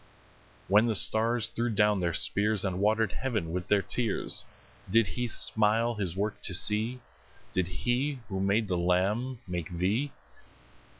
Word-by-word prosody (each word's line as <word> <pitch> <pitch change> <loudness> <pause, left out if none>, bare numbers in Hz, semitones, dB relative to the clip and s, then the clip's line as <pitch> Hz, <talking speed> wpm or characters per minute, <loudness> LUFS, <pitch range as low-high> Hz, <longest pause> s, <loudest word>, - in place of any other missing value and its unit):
When 105 +4 +4
the 110 - 0
stars 115 +3 +3
threw 120 +1 -2
down 105 -2 +2
their 85 -2 0
spears, 105 0 +2
And 95 -1 -2
water'd 110 +1 +2
heaven 110 -10 -3
with 90 +1 -4
their 100 -1 +2
tears, 115 -4 +1 0.4
Did 115 +3 +4
He 120 +5 -3
smile 110 +1 +1
His 95 -6 -3
work 105 +2 -3
to 90 - -3
see? 110 +7 0 0.5
Did 95 -2 0
He 125 +9 -1
who 95 -2 -4
made 100 +3 +1
the 90 -1 -1
lamb 105 +8 0
make 90 -3 -4
thee? 100 +11 -1
105 Hz, 155 wpm, -29 LUFS, 95-115 Hz, 0.5 s, When